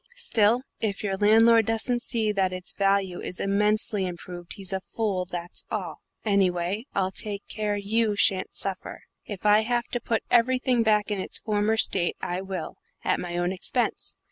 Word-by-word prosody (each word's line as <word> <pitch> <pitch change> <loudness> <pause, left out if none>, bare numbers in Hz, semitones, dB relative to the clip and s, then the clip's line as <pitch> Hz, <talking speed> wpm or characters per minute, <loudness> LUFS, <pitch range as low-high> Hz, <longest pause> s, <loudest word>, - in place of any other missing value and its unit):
Still, 240 - +2 0.2
if 205 -2 -2
your 195 -2 -1
landlord 225 +2 +5
doesn't 235 +2 0
see 225 -3 0
that 190 -2 +1
its 185 0 -5
value 195 -2 +1
is 180 - -6
immensely 210 0 +1
improved, 175 -1 -7
he's 195 -1 -5
a 190 - 0
fool, 190 -2 -2
that's 175 -1 -5
all. 185 -7 -4 0.2
Anyway, 195 +2 +1
I'll 190 -1 +1
take 205 0 -4
care 210 -1 -2
you 210 +1 +1
shan't 195 -1 +2
suffer. 195 -1 -2 0.2
If 205 -1 -7
I 210 0 +6
have 240 +2 0
to 245 - -3
put 225 -1 -1
everything 250 0 +3
back 210 -2 +2
in 205 - -1
its - - -5
former 215 +1 0
state, 185 -5 +2
I 180 +1 -3
will, 190 -4 -5 0.3
at - - +1
my 175 -1 -4
own 175 +1 0
expense. 195 +6 -1
205 Hz, 170 wpm, -26 LUFS, 185-220 Hz, 0.3 s, I